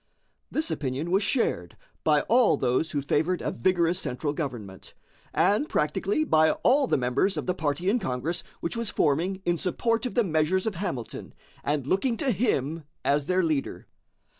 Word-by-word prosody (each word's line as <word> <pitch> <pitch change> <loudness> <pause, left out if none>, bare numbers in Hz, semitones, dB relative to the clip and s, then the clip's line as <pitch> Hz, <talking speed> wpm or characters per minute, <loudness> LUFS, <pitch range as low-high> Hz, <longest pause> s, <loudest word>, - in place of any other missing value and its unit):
This 315 +1 -2
opinion 140 +4 -3
was 195 +2 +3
shared 145 - -1 0.3
by 150 -2 +4
all 240 0 +3
those 130 +5 +1
who 145 -2 -2
favored 160 +6 +1
a - - -1
vigorous 175 +5 +1
central 145 -1 -3
government, 120 - -6 0.4
and 215 +10 +2
practically 195 - 0
by 160 - +4
all 275 +2 +4
the - - +2
members 125 +10 +1
of - - -3
the 180 - 0
party 160 0 -2
in 225 +5 +3
Congress 155 - -3 0.2
which 170 - -3
was 230 -2 -1
forming 180 +4 0
in 175 -1 +1
support 230 +6 0
of - - -8
the 240 - +4
measures 170 +1 +1
of 220 - -1
Hamilton 170 - -5 0.3
and 145 -2 -1
looking 200 - +1
to 265 - +1
him 165 - 0 0.2
as 145 0 +2
their 185 0 +2
leader. 155 -4 -2
170 Hz, 170 wpm, -26 LUFS, 145-200 Hz, 0.4 s, by